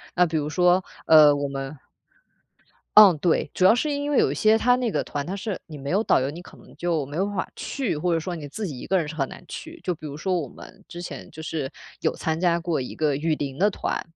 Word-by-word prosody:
那 180 Hz, -, +5 dB
比 165 Hz, -1 st, -4 dB
如 150 Hz, 0 st, -2 dB
说， 180 Hz, +2 st, +3 dB, 0.2 s
呃， 150 Hz, -2 st, +7 dB
我 145 Hz, 0 st, -2 dB
们 135 Hz, +1 st, -6 dB, 1.2 s
嗯， 200 Hz, -6 st, +9 dB
对， 160 Hz, -2 st, +1 dB
主 185 Hz, -, +2 dB
要 220 Hz, -, +7 dB
是 295 Hz, +5 st, 0 dB
因 285 Hz, 0 st, -2 dB
为 290 Hz, -, +2 dB
有 -, -, +4 dB
一 -, -, -3 dB
些 215 Hz, +1 st, +4 dB
它 245 Hz, +2 st, +3 dB
那 250 Hz, -2 st, 0 dB
个 -, -, -1 dB
团， 145 Hz, -1 st, -4 dB
它 185 Hz, -, -4 dB
是 200 Hz, 0 st, -4 dB
你 155 Hz, -, -9 dB
没 140 Hz, 0 st, -6 dB
有 195 Hz, +6 st, +2 dB
导 220 Hz, -, +3 dB
游 135 Hz, -, -1 dB
你 170 Hz, +4 st, -9 dB
可 180 Hz, -, -15 dB
能 -, -, -17 dB
就 165 Hz, -5 st, -1 dB
没 145 Hz, +3 st, -6 dB
有 190 Hz, -, +2 dB
办 205 Hz, 0 st, -5 dB
法 190 Hz, -, -3 dB
去， 260 Hz, -, -3 dB
或 175 Hz, +3 st, 0 dB
者 165 Hz, -, +2 dB
说 180 Hz, +2 st, -4 dB
你 145 Hz, -, -7 dB
自 210 Hz, +9 st, -5 dB
己 145 Hz, -9 st, -6 dB
一 -, -, -8 dB
个 190 Hz, -, +2 dB
人 170 Hz, -, 0 dB
是 150 Hz, -, -6 dB
很 135 Hz, -3 st, -1 dB
难 -, -, -11 dB
去。 330 Hz, +1 st, -8 dB
就 180 Hz, -, 0 dB
比 155 Hz, -2 st, -9 dB
如 140 Hz, -, -7 dB
说 180 Hz, +4 st, -1 dB
我 150 Hz, -, -4 dB
们 -, -, -14 dB
之 175 Hz, -1 st, -8 dB
前 175 Hz, -, -8 dB
就 160 Hz, -, -10 dB
是 155 Hz, -4 st, -3 dB, 0.3 s
有 -, -, 0 dB
参 160 Hz, 0 st, -2 dB
加 175 Hz, -1 st, +2 dB
过 170 Hz, -2 st, -1 dB
一 125 Hz, -, -6 dB
个 150 Hz, -3 st, +1 dB
雨 155 Hz, +1 st, 0 dB
林 140 Hz, -2 st, -5 dB
的 205 Hz, +3 st, +4 dB
团， -, -, -3 dB
170 Hz, 295 characters per minute, -24 LUFS, 150-190 Hz, 1.2 s, 嗯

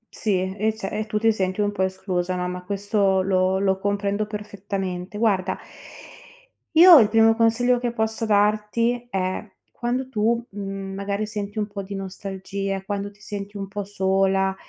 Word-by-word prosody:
Sì, 190 Hz, -3 st, -1 dB
eh 215 Hz, +1 st, 0 dB
ce 195 Hz, -3 st, -5 dB
e 215 Hz, +1 st, -3 dB
tu 215 Hz, 0 st, -1 dB
ti 225 Hz, +1 st, +4 dB
senti 190 Hz, -2 st, -2 dB
un 205 Hz, 0 st, +1 dB
po' 205 Hz, -, -4 dB
esclusa, 185 Hz, -1 st, -1 dB
no, 180 Hz, 0 st, -2 dB
ma 180 Hz, 0 st, -5 dB
questo 200 Hz, 0 st, +1 dB
lo 185 Hz, 0 st, +2 dB
lo 190 Hz, -1 st, +1 dB
comprendo 200 Hz, +1 st, -1 dB
perfettamente. 200 Hz, -3 st, -5 dB
Guarda 205 Hz, -4 st, +1 dB, 1.2 s
io 345 Hz, +1 st, +10 dB
il 225 Hz, -6 st, +6 dB
primo 225 Hz, +1 st, +5 dB
consiglio 240 Hz, +2 st, +3 dB
che 240 Hz, 0 st, -2 dB
posso 220 Hz, 0 st, -1 dB
darti 215 Hz, +3 st, +1 dB
è: 185 Hz, 0 st, -2 dB, 0.2 s
quando 250 Hz, +2 st, -2 dB
tu, 230 Hz, 0 st, +1 dB
mhmm, 195 Hz, -1 st, -6 dB
magari 200 Hz, +2 st, -2 dB
senti 210 Hz, 0 st, -4 dB
un 210 Hz, -, -1 dB
po' 205 Hz, -1 st, -6 dB
di 195 Hz, +1 st, -8 dB
nostalgia, 195 Hz, 0 st, -4 dB
quando 200 Hz, 0 st, -3 dB
ti 205 Hz, -, -25 dB
senti 205 Hz, 0 st, -6 dB
un 195 Hz, -1 st, -4 dB
po' 205 Hz, +1 st, -4 dB
sola 195 Hz, -1 st, +1 dB
200 Hz, 170 wpm, -23 LUFS, 195-215 Hz, 1.2 s, io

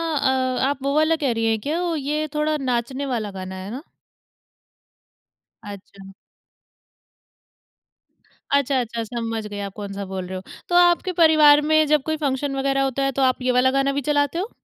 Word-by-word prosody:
अ, 260 Hz, -2 st, 0 dB
आप 280 Hz, -1 st, -4 dB
वो 275 Hz, 0 st, 0 dB
वाला 310 Hz, +1 st, +3 dB
कह 290 Hz, -5 st, -1 dB
रहीं 225 Hz, 0 st, -1 dB
हैं 220 Hz, -1 st, +1 dB
क्या? 310 Hz, +8 st, -2 dB, 0.2 s
ये 300 Hz, +2 st, -2 dB
थोड़ा 305 Hz, 0 st, 0 dB
नाचने 260 Hz, 0 st, -2 dB
वाला 230 Hz, -6 st, -3 dB
गाना 190 Hz, -1 st, -7 dB
है 190 Hz, +2 st, -7 dB
ना? 260 Hz, +5 st, -7 dB, 1.8 s
अच्छा। 195 Hz, -1 st, -11 dB, 2.4 s
अच्छा, 280 Hz, -1 st, +2 dB
अच्छा, 235 Hz, -1 st, -3 dB
समझ 225 Hz, -1 st, -4 dB
गई, 205 Hz, -1 st, -7 dB
आप 200 Hz, -1 st, -5 dB
कौन-सा 200 Hz, -1 st, -6 dB
बोल 190 Hz, -1 st, -5 dB
रहे 185 Hz, -, -6 dB
हो। -, -, -7 dB, 0.3 s
तो 350 Hz, -, 0 dB
आपके 350 Hz, +1 st, +4 dB
परिवार 305 Hz, -2 st, +6 dB
में 310 Hz, 0 st, +5 dB
जब 300 Hz, -2 st, +2 dB
कोई 315 Hz, +1 st, -2 dB
फंक्शन 275 Hz, +1 st, -1 dB
वगैरह 275 Hz, 0 st, 0 dB
होता 270 Hz, 0 st, -1 dB
है, 275 Hz, -, +1 dB
तो 270 Hz, -, -2 dB
आप 255 Hz, -1 st, +2 dB
ये 255 Hz, 0 st, +1 dB
वाला 250 Hz, +1 st, +3 dB
गाना 275 Hz, +1 st, +1 dB
भी 285 Hz, -, -1 dB
चलाते 290 Hz, +3 st, +1 dB
हो? 395 Hz, +5 st, -3 dB
265 Hz, 175 wpm, -22 LUFS, 225-290 Hz, 2.4 s, परिवार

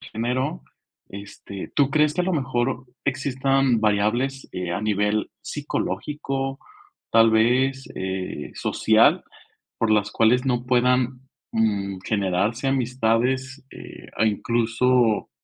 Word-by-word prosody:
género, 130 Hz, +6 st, -3 dB, 0.5 s
este, 100 Hz, -1 st, -9 dB
¿tú 140 Hz, -1 st, +3 dB
crees 150 Hz, 0 st, +2 dB
que 180 Hz, -, 0 dB
a -, -, -1 dB
lo 185 Hz, -, -1 dB
mejor 130 Hz, -3 st, -1 dB, 0.2 s
existan 135 Hz, -2 st, +1 dB
variables, 110 Hz, +6 st, 0 dB
eh, 90 Hz, -1 st, -4 dB
a -, -, -2 dB
nivel 105 Hz, 0 st, 0 dB
psicológico, 135 Hz, -, -3 dB, 0.5 s
tal 115 Hz, 0 st, +5 dB
vez, 130 Hz, +4 st, +2 dB
eh, 95 Hz, 0 st, -4 dB
social, -, -, +3 dB, 0.6 s
por 115 Hz, -, +1 dB
las 105 Hz, -1 st, +2 dB
cuales 120 Hz, +3 st, +3 dB
no 125 Hz, -2 st, 0 dB
puedan, 125 Hz, 0 st, +2 dB, 0.3 s
mm, 100 Hz, -4 st, 0 dB
generarse 105 Hz, +5 st, 0 dB
amistades, 130 Hz, +1 st, 0 dB
eh, -, -, -11 dB
a 110 Hz, -, +2 dB
incluso, 115 Hz, +1 st, +1 dB
120 Hz, 115 wpm, -23 LUFS, 110-135 Hz, 0.6 s, tal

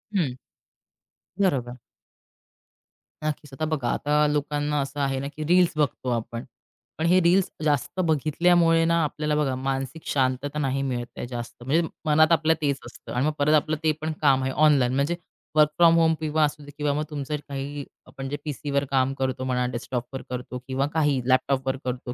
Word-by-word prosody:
हं. 150 Hz, -10 st, +1 dB, 1.1 s
बरोबर. 125 Hz, -10 st, +1 dB, 1.5 s
नक्कीच. 150 Hz, -2 st, -4 dB
आता 155 Hz, +3 st, -2 dB
बघा 140 Hz, -6 st, -1 dB
आता 150 Hz, +1 st, +2 dB
लोकांना 150 Hz, 0 st, 0 dB
असं 140 Hz, +1 st, -5 dB
आहे 135 Hz, -1 st, 0 dB
ना, 140 Hz, -, -3 dB
की 155 Hz, +2 st, -6 dB
रील्स 180 Hz, 0 st, +4 dB
बघतो 135 Hz, -3 st, 0 dB
आपण. 115 Hz, 0 st, -3 dB, 0.5 s
पण 160 Hz, -, -1 dB
हे 180 Hz, +2 st, +5 dB
रील्स 180 Hz, +3 st, +3 dB
जास्त 150 Hz, +5 st, 0 dB
बघितल्यामुळे 165 Hz, +2 st, +3 dB
ना, 170 Hz, 0 st, +3 dB
आपल्याला 150 Hz, 0 st, -1 dB
बघा 140 Hz, -4 st, +1 dB
मानसिक 135 Hz, +3 st, -3 dB
शांतता 135 Hz, +2 st, 0 dB
नाही 135 Hz, -1 st, 0 dB
मिळत 120 Hz, -3 st, -2 dB
ते -, -, -4 dB
जास्त, 120 Hz, -1 st, -7 dB
म्हणजे 160 Hz, +6 st, +1 dB, 0.2 s
मनात 155 Hz, +2 st, +4 dB
आपलं 160 Hz, -1 st, +4 dB
तेच 140 Hz, -2 st, +1 dB
असतं -, -, -11 dB
आणि 125 Hz, +3 st, +1 dB
मग 155 Hz, -, +2 dB
परत 145 Hz, +2 st, +3 dB
आपलं 155 Hz, +1 st, +1 dB
ते 155 Hz, -, +4 dB
पण 155 Hz, +1 st, -2 dB
काम 135 Hz, -3 st, +4 dB
आहे 130 Hz, -, -1 dB
ऑनलाईन 140 Hz, -4 st, +4 dB
म्हणजे 140 Hz, +5 st, +1 dB, 0.4 s
वर्क 150 Hz, -1 st, +6 dB
फ्रॉम 170 Hz, -1 st, +6 dB
होम 160 Hz, 0 st, +4 dB
किंवा 155 Hz, 0 st, +1 dB
असू 150 Hz, 0 st, -1 dB
दे 145 Hz, -, -11 dB
किंवा 145 Hz, -1 st, 0 dB
मग 150 Hz, -, -1 dB
तुमचं 150 Hz, 0 st, -3 dB
काही 140 Hz, +1 st, -4 dB, 0.2 s
आपण 135 Hz, 0 st, -7 dB
जे 145 Hz, -, -2 dB
पीसीवर 140 Hz, -1 st, -1 dB
काम 135 Hz, 0 st, +2 dB
करतो 130 Hz, -1 st, -2 dB
म्हणा 125 Hz, -1 st, 0 dB
डेस्कटॉपवर 125 Hz, +1 st, -4 dB
करतो 125 Hz, 0 st, -5 dB
किंवा 135 Hz, +1 st, 0 dB
काही 145 Hz, -4 st, +2 dB
लॅपटॉपवर 130 Hz, +1 st, +2 dB
करतो 125 Hz, -1 st, -4 dB
145 Hz, 175 wpm, -25 LUFS, 130-155 Hz, 1.5 s, वर्क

